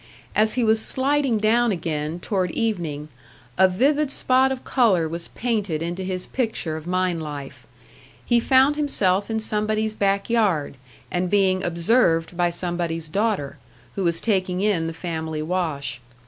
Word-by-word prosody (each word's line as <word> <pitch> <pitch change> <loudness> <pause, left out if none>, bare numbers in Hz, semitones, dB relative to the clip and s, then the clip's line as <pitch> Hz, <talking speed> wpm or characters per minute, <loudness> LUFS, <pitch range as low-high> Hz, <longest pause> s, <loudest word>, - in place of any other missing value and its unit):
As 215 +1 +3
he 250 - 0
was 220 0 +3
sliding 270 -2 +1
down 225 +2 +3
again, 160 -2 -3
toward 185 -1 -1
evening, 165 -8 -2 0.5
a 190 - +6
vivid 280 +10 +1
spot 265 -1 +3
of 260 -1 -4
colour 200 -11 +2
was 170 +1 -5
painted 205 -9 -2
into 175 +3 -4
his 185 -1 -3
picture 220 -10 -2
of 160 +1 -8
mine 180 -1 0
life; 145 -3 -8 0.6
he 240 -1 +3
found 265 +4 +4
himself 200 -10 +1
in 220 0 -1
somebody's 215 0 -1
back 200 -1 0
yard, 200 -12 +1 0.4
and 180 0 -1
being 190 -1 +2
observed 170 -1 +2
by 175 0 +2
somebody's 170 -2 -3
daughter, 180 -7 -1 0.3
who 195 - -3
was 170 -1 +1
taking 185 -4 0
in 195 -6 +1
the 165 - -4
family 160 -2 -4
wash. 155 -7 -2
185 Hz, 150 wpm, -23 LUFS, 165-220 Hz, 0.6 s, a